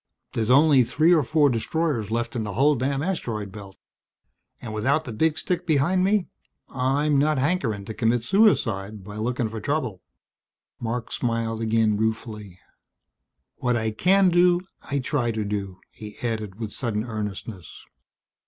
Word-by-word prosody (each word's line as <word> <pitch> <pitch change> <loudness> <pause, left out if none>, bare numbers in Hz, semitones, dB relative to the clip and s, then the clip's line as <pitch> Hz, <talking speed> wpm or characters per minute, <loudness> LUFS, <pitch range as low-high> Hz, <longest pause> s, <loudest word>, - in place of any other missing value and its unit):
There's 110 0 -1
only 140 0 +6
three 155 +8 +3
or 165 - +5
four 145 +1 +3
destroyers 120 -1 -1
left 120 +2 -2
in 115 - -1
the 105 -1 -4
whole 140 +8 +4
damn 135 +2 -1
Asteroid 115 - -3
Belt. 100 -1 -11 0.8
And 110 -3 -7
without 135 +9 +1
the 120 - -6
big 160 +7 +1
stick 180 -1 -2
behind 165 +5 +2
me 200 -1 +2 0.4
I'm 140 +3 +1
not 150 +1 +2
hankering 130 - 0
to 110 - -6
commit 115 +1 +1
suicide 115 - +2
by 105 +2 -9
looking 120 +1 -1
for 110 0 -6
trouble." 125 - -2 0.8
Marc 115 0 -4
smiled 115 -2 -2
again 110 -1 +2
ruefully. 110 -3 -3 1.0
"What 125 -1 0
I 110 -1 -1
can 185 - +4
do 175 0 +4 0.3
I 140 - 0
try 130 -2 0
to 110 -2 -2
do," 100 -2 -4
he 105 -1 -11
added 110 -4 -3
with 110 -2 -5
sudden 110 -4 -2
earnestness. 105 -4 -6
120 Hz, 155 wpm, -24 LUFS, 110-150 Hz, 1.0 s, only